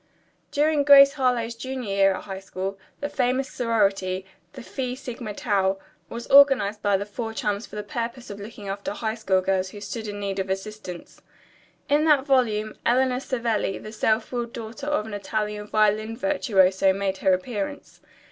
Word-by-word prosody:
During 295 0 +2
"Grace 280 -1 +8
Harlowe's 250 -4 0
Junior 250 -3 -5
Year 195 -1 +4
at - - -7
High 190 -1 -6
School" 195 0 -5 0.2
the 290 - -1
famous 260 -1 0
sorority, 195 -5 0 0.3
the 260 - -9
Phi 255 0 -4
Sigma 240 -5 -7
Tau, 195 -3 +1 0.3
was 235 +1 -6
organized 260 -7 +5
by 205 -2 +2
the 200 - -4
four 225 +2 -5
chums 210 0 -2
for - - -12
the 210 - -4
purpose 235 +3 -5
of 200 - -8
looking 205 0 -9
after 200 +1 -4
high 220 0 -2
school 195 -5 +1
girls 190 0 0
who 205 - -10
stood 210 +2 -6
in 205 0 -5
need 200 -1 -3
of 190 0 -2
assistance. 190 -2 -6 0.7
In 295 +2 +3
that 295 -4 +4
volume 220 -6 +1
Eleanor 255 +1 +2
Savelli, 230 -7 -1
the 215 - -9
self 220 0 0
willed 240 -2 -3
daughter 235 +5 -7
of 295 -8 0
an 220 - -8
Italian 210 +1 -3
violin 215 +1 +1
virtuoso, 195 -10 +3
made 195 0 -2
her 190 0 +2
appearance. 210 +7 -4
215 Hz, 175 wpm, -25 LUFS, 200-250 Hz, 0.7 s, Grace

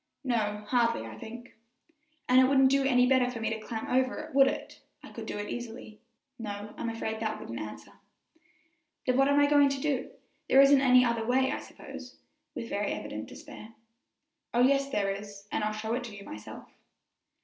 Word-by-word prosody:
"No, 215 -5 -1
hardly, 235 - +2
I 110 -1 -8
think," 235 - -10 0.7
"And 255 +1 +6
it - - +6
wouldn't 265 0 +4
do 275 0 +3
any 250 -2 +4
better 255 -1 +3
for 245 -2 -6
me 225 0 -1
to 220 - -3
climb 220 +1 -5
over 255 0 +1
it, 310 +1 -8
would 270 0 +6
it? - - -5 0.2
I - - -11
could - - -8
do - - -4
it 205 0 -4
easily." 230 -2 -8 0.4
"No, 210 -1 -6
I'm 235 - -3
afraid 220 -1 -4
that 220 -1 -2
wouldn't 115 0 -6
answer." 105 -1 -8 1.1
"Then, 255 - +2
what 270 +1 +4
are 285 0 +3
we 290 - +6
going 285 -1 +5
to 275 0 -2
do? 275 -2 -1 0.4
There 265 - +6
isn't 275 0 +7
any 255 -1 +6
other 235 -1 0
way, 260 +3 +2
I - - -2
suppose," - - -11 0.4
with - - -5
very - - -2
evident - - -6
despair. 220 +1 -11 0.8
"Oh, 240 - +4
yes, 275 +2 +3
there 200 -6 0
is, 200 0 -8
and - - -1
I'll 215 - 0
show 215 +1 -3
it 245 +1 -2
to 220 -3 -9
you 200 - -10
myself." 105 0 -9
240 Hz, 200 wpm, -29 LUFS, 215-265 Hz, 1.1 s, isn't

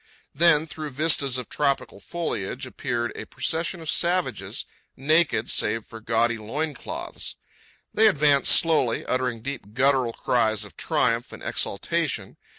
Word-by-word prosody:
Then, 160 0 +5
through 155 -1 -6
vistas 140 -2 +2
of 125 - -5
tropical 140 -8 -1
foliage 160 - -4
appeared 120 0 -3
a - - -6
procession 165 +2 -1
of 160 - -9
savages, 180 +1 0 0.3
naked 155 -4 +2
save 110 +1 0
for 115 -1 -11
gaudy 115 +1 +1
loin 145 +9 -3
cloths. - - -6 0.6
They 220 +1 +5
advanced 145 -7 +4
slowly, 155 -8 +3
uttering 125 -3 -2
deep 120 -6 -6
guttural 130 -2 +2
cries 110 -4 +1
of 100 - -15
triumph - - 0
and - - -10
exaltation. - - -2
135 Hz, 135 wpm, -25 LUFS, 115-160 Hz, 0.6 s, Then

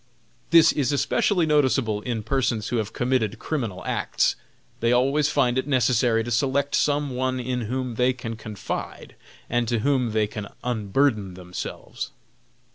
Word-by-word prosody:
This 165 -1 +7
is 140 -2 0
especially 180 +5 +2
noticeable 130 -8 +2
in 115 -1 -3
persons 115 -2 0
who 120 - 0
have 110 -2 -2
committed 125 -4 0
criminal 115 -12 -4
acts. - - +1 0.4
They 115 +1 +2
always 135 +4 +3
find 130 -4 +2
it 130 - -3
necessary 120 -3 +2
to 120 - -5
select 135 +4 +1
some 145 -1 +1
one 130 0 -1
in 125 0 -2
whom 130 -1 -2
they 125 +3 +2
can 120 -3 -6
confide 110 -2 -6 0.3
and 120 -1 0
to 115 -2 0
whom 130 -3 +1
they 110 0 +2
can 105 0 -6 0.2
unburden 110 -3 0
themselves. 90 0 -6
125 Hz, 150 wpm, -24 LUFS, 110-135 Hz, 0.4 s, This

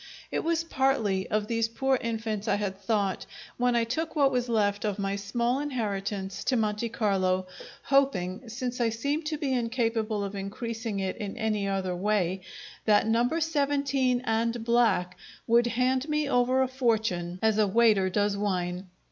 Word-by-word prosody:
It - - -1
was 330 0 +1
partly 265 - +1
of 215 0 0
these 230 0 0
poor 265 +4 +1
infants 220 -2 -3
I 200 - +3
had 205 -2 -2
thought 195 -3 -1 0.3
when 245 0 +2
I 235 - +3
took 310 +9 -3
what 280 -3 +4
was 250 -1 -1
left 205 -3 +1
of 210 -2 -1
my 200 -1 -1
small 235 +6 -1
inheritance 200 -8 -3
to 255 - +2
Monte 215 +1 0
Carlo, 185 -4 +1 0.4
hoping, 235 -6 +1
since 245 +1 -3
I 230 - +3
seemed 285 +8 -2
to 305 0 -2
be 285 -3 -1
incapable 230 -3 0
of 200 0 -4
increasing 220 +2 -4
it 190 -1 -2
in 205 -4 -5
any 215 -2 0
other 190 -2 -1
way, 190 -1 0 0.4
that 210 -1 +4
number 240 +8 +2
seventeen 280 -5 +1
and 230 +1 0
black 230 -7 +2 0.3
would 235 +1 +4
hand 255 +4 0
me 300 -1 +1
over 255 0 +3
a - - 0
fortune 220 -9 0
as 220 -1 +3
a 210 - +4
waiter 210 -2 +4
does 205 +1 +1
wine. 185 -2 -2
225 Hz, 165 wpm, -28 LUFS, 200-250 Hz, 0.4 s, what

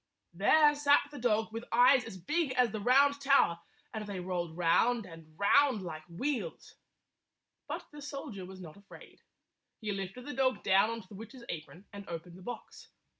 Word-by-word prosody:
There 295 - +5
sat 290 0 +4
the 290 - -8
dog 220 -2 +1
with 225 +1 -5
eyes 245 +2 +6
as 190 - -8
big 295 - -1
as 250 -2 +2
the 215 - -4
Round 275 +5 +4
Tower, 275 -11 +3 0.3
and 215 -2 -5
they 200 -2 -5
rolled 175 -2 -4
round 220 +7 +2
and 165 -3 -14
round 250 +1 +3
like 160 -3 -6
wheels. 210 - -4 0.9
But - - -5
the 295 0 -11
soldier 275 -8 -7
was 190 +1 -10
not 165 -2 -11
afraid. 200 0 -15 0.6
He 215 -2 -3
lifted 195 +5 -5
the 290 - -5
dog 260 0 0
down 195 +3 +4
on 230 0 -4
to - - -21
the 205 - -14
witch's 230 +4 -10
apron 170 +4 -7
and 200 -1 -9
opened 170 +1 -7
the 185 - -13
box. 245 +7 -9
215 Hz, 180 wpm, -31 LUFS, 185-260 Hz, 0.9 s, eyes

